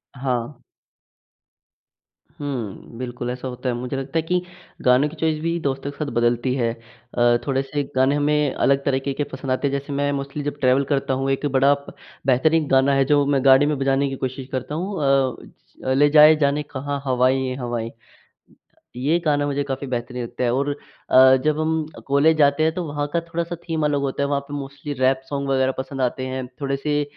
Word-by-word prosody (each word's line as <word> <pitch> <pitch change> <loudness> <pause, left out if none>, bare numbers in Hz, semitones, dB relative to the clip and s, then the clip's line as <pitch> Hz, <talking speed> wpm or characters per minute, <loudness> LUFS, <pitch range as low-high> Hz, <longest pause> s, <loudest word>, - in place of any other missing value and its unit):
हाँ। 125 0 -3 1.7
हुँ, 120 -6 -6
बिल्कुल 125 -1 -5
ऐसा 125 +1 -5
होता 125 0 -4
है। 120 - -1
मुझे 125 +2 -4
लगता 135 +4 -3
है - - +3
कि 180 +2 0 0.4
गानों 125 +4 +5
की 160 - -11
चॉइस 160 -1 0
भी 165 +1 -1
दोस्तों 140 +1 -3
के - - -17
साथ 150 -2 -3
बदलती 120 +2 +1
है। 115 -3 0
अ, 120 +1 -1
थोड़े 135 0 +1
से 145 +1 -3
गाने 130 +2 +3
हमें 145 -1 +1
अलग 140 0 +2
तरीक़े 135 0 0
के 145 - -2
पसंद 135 0 -4
आते 130 +2 +1
हैं, - - -2
जैसे 140 +1 -8
मैं 145 0 0
मोस्टली 140 +1 -5
जब 145 0 -4
ट्रैवल 130 +2 +4
करता 135 -2 0
हूँ, 135 +1 -1
एक 135 +2 -1
बड़ा 140 0 +4
प 140 0 -8 0.3
बेहतरीन 150 +4 +3
गाना 135 +1 +4
है 135 -1 +3
जो 145 0 +3
मैं 140 -1 +1
गाड़ी 135 +1 +7
में 150 0 0
बजाने 135 +1 +1
की 135 - -4
कोशिश 130 0 -6
करता 130 +4 -4
हूँ 185 +2 -3
अ, 135 -2 +2
ज - - -17 0.5
ले 145 +1 +5
जाए 155 +1 +8
जाने 140 +1 +2
कहाँ, 140 0 -5
हवाएँ 130 0 +2
ये 130 - -3
हवाएँ 120 -3 -3
अ, - - -18 1.0
ये 145 +7 +1
गाना 145 -1 +2
मुझे 145 0 -1
काफ़ी 135 0 -4
बेहतरीन 125 0 -4
लगता 120 +2 -5
है 120 - +2
और 140 +2 0 0.4
अ, 130 0 +8
जब 155 0 +2
हम 160 0 0 0.2
कॉलेज 150 +3 +4
जाते 145 +1 +3
हैं 160 0 +2
तो 180 - -2
वहाँ 145 0 -2
का 170 - +1
थोड़ा-सा 170 +1 -4
थीम 160 -2 0
अलग 145 -1 +1
होता 140 0 -1
है, - - 0
वहाँ 140 -1 0
पे 145 - -8
मोस्टली 140 +1 -6
रैप 130 0 +2
सॉन्ग 140 -1 -3
वग़ैरह 130 0 +2
पसंद 135 0 -4
आते 130 +1 -1
हैं। 130 -1 -4
थोड़े 140 0 -1
से 145 +1 0
140 Hz, 210 wpm, -22 LUFS, 130-145 Hz, 1.7 s, जाए